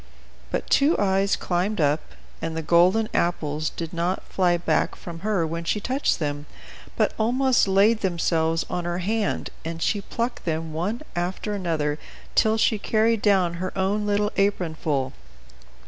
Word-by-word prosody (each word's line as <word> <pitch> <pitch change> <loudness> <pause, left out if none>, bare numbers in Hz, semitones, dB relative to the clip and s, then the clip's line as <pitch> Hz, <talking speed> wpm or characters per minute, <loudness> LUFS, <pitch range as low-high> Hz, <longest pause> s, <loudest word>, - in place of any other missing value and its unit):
But - - -2
Two 290 +4 +4
Eyes 195 0 +2
climbed 185 +4 -1
up, 150 0 +2 0.4
and 165 0 -3
the 160 - -3
golden 180 +7 +4
apples 155 -3 0
did 165 0 -6
not 175 +2 -1
fly 175 -2 +1
back 170 - 0
from 170 -1 -8
her 195 -3 0
when 165 +1 -4
she 190 +5 0
touched 260 +7 0
them, 145 -1 -3 0.5
but - - +1
almost 255 +2 +3
laid 200 +4 +4
themselves 165 -3 +1
on 175 -1 -3
her 175 0 -1
hand, 205 +3 -1
and 165 0 -5
she 205 +4 0
plucked 235 +4 -3
them 160 -1 -2
one 200 - -2
after 180 +4 -2
another, 160 -6 -1 0.3
till 220 0 +3
she 220 -1 +2
carried 220 +1 +2
down 190 -4 +3
her 185 - -2
own 205 +2 0
little 205 +1 +1
apron 195 -4 +1
full. 140 -4 -1
180 Hz, 160 wpm, -24 LUFS, 165-210 Hz, 0.5 s, Two